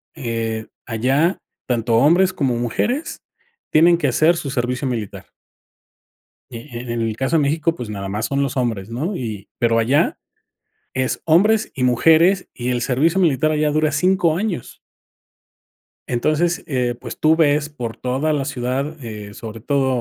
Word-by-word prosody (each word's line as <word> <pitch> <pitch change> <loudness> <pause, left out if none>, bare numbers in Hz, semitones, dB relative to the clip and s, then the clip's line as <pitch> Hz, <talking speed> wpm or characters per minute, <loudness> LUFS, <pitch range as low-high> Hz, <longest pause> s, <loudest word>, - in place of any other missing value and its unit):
eh, 115 -5 -3 0.2
allá 135 - +1 0.3
tanto 115 -2 +1
hombres 175 +9 +4
como 135 -8 0
mujeres 220 - -2 0.5
tienen 170 +2 +5
que 150 - 0
hacer 155 +7 +3
su 145 - -4
servicio 125 +1 -1
militar. 115 -5 -4 1.3
E-en 120 -1 -5
el 110 -1 -1
caso 135 +6 0
de - - +3
México, 155 +3 +1
pues, 120 -8 -7
nada 100 -2 -5
más 105 +3 -2
son 140 +1 0
los 140 0 -3
hombres, 115 -6 -1
¿no? 150 - -3
Y 110 - -6
pero 115 -1 +3
allá, 125 +6 +2 0.8
es 130 0 -1
hombres 210 +7 +3
y 130 - -2
mujeres 165 +9 +4
y 125 0 -4
el 125 -1 0
servicio 150 +9 +1
militar 155 -4 +2
allá 150 0 +1
dura 155 0 +1
5 170 +1 +2
años. 195 - -4 1.3
Entonces, 155 +8 0
eh, 125 -4 -1
pues, - - -8
tú 155 +1 +4
ves 150 -2 +2
por 120 -6 -6
toda 135 +5 -1
la 145 -2 0
ciudad, 135 +5 -3
eh, 105 -3 -7
sobre 110 0 -8
todo, 140 +2 +1
135 Hz, 155 wpm, -20 LUFS, 120-155 Hz, 1.3 s, tienen